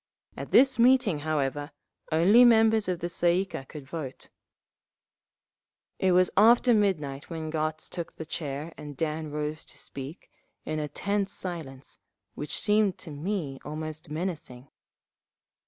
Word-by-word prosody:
At - - -7
this 265 -2 +5
meeting, 235 - +4
however, 145 -1 -1 0.4
only 190 +10 +6
members 225 -3 +5
of 180 -2 -2
the 175 - -1
Tsay 175 0 +2
ee - - -3
kah 165 - -7
could 145 0 -10
vote…. 140 -3 -7 1.7
It 185 -1 +3
was 180 0 +4
after 235 +4 +6
midnight 155 -10 0
when 160 -2 -5
Gotz 155 0 -2
took 170 -2 -6
the 160 - -7
chair 150 0 -5
and 145 -2 -8
Dan 155 0 -2
rose 150 +1 -4
to - - -10
speak, 140 +4 -8 0.3
in 155 0 -2
a 150 - -2
tense 200 +4 -1
silence, 155 -8 -7 0.3
which 150 - -3
seemed 210 -2 +2
to 160 - -9
me 150 -3 -3
almost 155 +1 -6
menacing. 150 -6 -5
160 Hz, 140 wpm, -28 LUFS, 150-195 Hz, 1.7 s, only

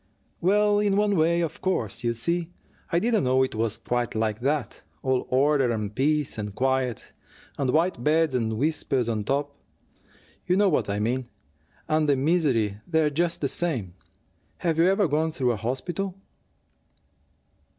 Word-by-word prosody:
"Well, 205 +3 +3
in 205 -1 +2
one 205 -1 +2
way, 170 +1 +2
of 165 - -4
course 120 - -1
you 120 0 +1
see, 170 +8 -1 0.4
I 170 - +2
didn't 220 +1 +2
know 130 +1 +3
it 130 - -2
was 115 0 -1
quite 120 -1 -2
like 110 -1 -1
that: 140 0 -2 0.2
all 130 -1 0
order 135 0 +3
and 105 -3 -2
peace 150 -2 0
and 105 -1 -5
quiet, 130 -3 -1 0.4
and 140 -3 -1
white 160 -2 +1
beds 155 0 +2
and 110 -3 -1
whispers, 135 -3 0
on 110 -3 -2
top, 140 +2 -1 0.9
you 180 - +3
know 205 -1 +4
what - - 0
I 100 - -1
mean, 120 +3 -1 0.6
and 155 -1 +1
the 140 - +4
misery 130 - +1
there 160 -3 +2
just 170 +3 -1
the 140 - +1
same. 135 - -2 0.6
Have 165 -2 -1
you 170 - +5
ever 195 0 +3
gone 155 +2 0
through 125 -5 +1
a - - -1
hospital?" 175 - -3
140 Hz, 160 wpm, -25 LUFS, 120-170 Hz, 0.9 s, you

